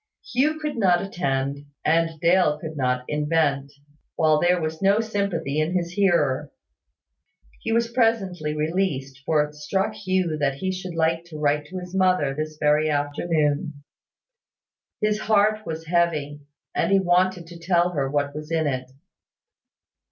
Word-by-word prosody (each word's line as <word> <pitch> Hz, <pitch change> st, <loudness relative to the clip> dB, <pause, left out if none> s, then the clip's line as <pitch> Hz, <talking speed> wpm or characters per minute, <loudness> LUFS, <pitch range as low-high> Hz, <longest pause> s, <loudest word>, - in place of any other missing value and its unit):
Hugh 295 Hz, +5 st, +2 dB
could 300 Hz, -4 st, -4 dB
not 185 Hz, -5 st, +4 dB
attend; 140 Hz, -7 st, -2 dB, 0.3 s
and 165 Hz, 0 st, +2 dB
Dale 170 Hz, -3 st, +3 dB
could 155 Hz, 0 st, -7 dB
not 125 Hz, -2 st, 0 dB
invent, 150 Hz, -2 st, 0 dB, 0.4 s
while 155 Hz, -2 st, +3 dB
there 180 Hz, +1 st, +3 dB
was 160 Hz, -1 st, -4 dB
no 200 Hz, +2 st, +4 dB
sympathy 200 Hz, -9 st, -1 dB
in 160 Hz, +4 st, 0 dB
his 170 Hz, -1 st, -1 dB
hearer. 150 Hz, -8 st, +1 dB, 1.1 s
He 225 Hz, -, -3 dB
was 230 Hz, 0 st, +1 dB
presently 195 Hz, -10 st, 0 dB
released, 150 Hz, -5 st, -1 dB
for 155 Hz, -2 st, +3 dB
it 150 Hz, 0 st, -7 dB
struck 190 Hz, +8 st, -1 dB
Hugh 185 Hz, -6 st, -1 dB
that 140 Hz, -2 st, +1 dB
he 190 Hz, +6 st, -2 dB
should 185 Hz, -2 st, -6 dB
like 165 Hz, +1 st, +1 dB
to 165 Hz, -3 st, -9 dB
write 150 Hz, 0 st, 0 dB
to 185 Hz, -, -7 dB
his 180 Hz, 0 st, -8 dB
mother 185 Hz, -7 st, +2 dB
this 155 Hz, +1 st, -5 dB
very 150 Hz, +1 st, +3 dB
afternoon. 145 Hz, 0 st, -1 dB, 1.2 s
His 210 Hz, 0 st, +1 dB
heart 215 Hz, 0 st, +2 dB
was 160 Hz, 0 st, -5 dB
heavy, 160 Hz, -4 st, 0 dB, 0.3 s
and -, -, 0 dB
he 195 Hz, -, +5 dB
wanted 180 Hz, -1 st, +2 dB
to 170 Hz, 0 st, -12 dB
tell 175 Hz, 0 st, +2 dB
her 140 Hz, -5 st, -1 dB
what 145 Hz, 0 st, -1 dB
was 150 Hz, +1 st, -7 dB
in 160 Hz, -1 st, +1 dB
it. 130 Hz, -3 st, -2 dB
165 Hz, 150 wpm, -24 LUFS, 150-185 Hz, 1.2 s, he